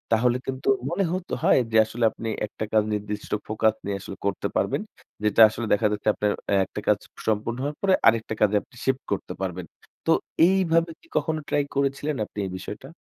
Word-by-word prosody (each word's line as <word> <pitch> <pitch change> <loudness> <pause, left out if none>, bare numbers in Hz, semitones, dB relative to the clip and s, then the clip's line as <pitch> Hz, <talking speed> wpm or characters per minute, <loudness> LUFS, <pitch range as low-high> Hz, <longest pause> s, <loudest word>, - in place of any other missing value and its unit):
তাহলে 125 +2 +2
কিন্তু 135 0 -2 0.2
মনে 180 +3 0
হত 185 0 -4
হয় - - +5
যে 110 - +3
আসলে 115 +2 -4
আপনি 115 - -5 0.2
একটা 110 - -5
কাজ 110 - +5
নির্দিষ্ট 105 0 -4 0.2
ফোকাস 110 0 +2
নিয়ে 100 -1 -2
আসলে 95 - -8
করতে 100 -2 0
পারবেন? - - +1 0.4
যেটা 105 +1 +4
আসলে 115 +2 -4
দেখা 105 - +3
যাচ্ছে 105 0 -4
আপনার 105 0 0 0.2
এ - - +5
একটা - - -7
কাজ - - +5 0.3
সম্পূর্ণ 110 +2 0
হওয়ার 145 +1 -3
পরে 195 -1 +3
আরেকটা 115 -1 +3
কাজে 105 0 +4
আপনি - - -23
শিফট 135 0 +1
করতে 95 -2 -2
পারবেন। 90 -2 -3 0.4
তো - - +3 0.4
এইভাবে 170 -3 +2
কী 330 - -24
কখনো 160 -1 0
ট্রাই 145 - +2
করেছিলেন 140 +2 0
আপনি 105 - -9
এই 95 - -5
বিষয়টা? 105 +7 -8
115 Hz, 195 wpm, -25 LUFS, 105-140 Hz, 0.4 s, হয়